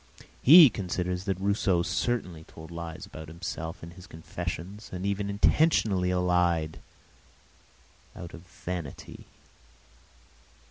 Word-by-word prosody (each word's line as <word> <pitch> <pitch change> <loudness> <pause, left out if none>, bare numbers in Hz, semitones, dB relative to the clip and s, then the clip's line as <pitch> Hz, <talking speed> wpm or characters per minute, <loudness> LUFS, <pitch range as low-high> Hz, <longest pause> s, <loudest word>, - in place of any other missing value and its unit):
He 155 -1 +9
considers 90 -1 -3
that 95 -3 -1
Rousseau 100 -3 +1
certainly 90 -8 -2
told 80 +1 -12
lies 85 -1 -7
about 80 0 -10
himself 85 0 -6
in 85 - -8
his 90 +1 -13
confessions, 90 +5 -6
and 90 +1 -5
even 100 0 -1
intentionally 100 - +2
lied, 90 -3 +1 1.4
out 85 -2 -9
of 85 - -10
vanity. 90 -3 -8
90 Hz, 105 wpm, -28 LUFS, 85-100 Hz, 1.4 s, He